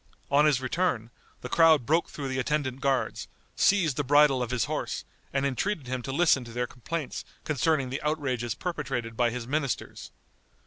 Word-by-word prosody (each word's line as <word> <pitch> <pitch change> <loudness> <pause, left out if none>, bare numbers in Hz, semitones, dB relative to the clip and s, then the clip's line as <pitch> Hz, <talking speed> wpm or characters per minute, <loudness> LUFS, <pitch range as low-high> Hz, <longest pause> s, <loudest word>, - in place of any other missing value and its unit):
On 145 +2 +5
his 145 -4 +4
return 130 -5 -1 0.3
the - - -5
crowd 160 -2 +5
broke 165 +5 +2
through 140 -2 -5
the 130 0 -2
attendant 135 -1 -1
guards, 135 -2 0 0.3
seized 175 -9 +3
the 145 - +1
bridle 145 -1 +5
of 120 - -2
his 125 -3 0
horse, - - -3 0.3
and 135 0 0
entreated 150 - -1
him 130 0 -3
to 135 - -5
listen 140 -3 +3
to 115 - -10
their 125 +1 -1
complaints 135 +5 -5 0.2
concerning 140 -2 +1
the 130 - -3
outrages 130 -7 -1
perpetrated 135 -9 -3
by 120 +1 +2
his 120 0 -5
ministers. 140 0 -3
135 Hz, 175 wpm, -28 LUFS, 125-155 Hz, 0.3 s, On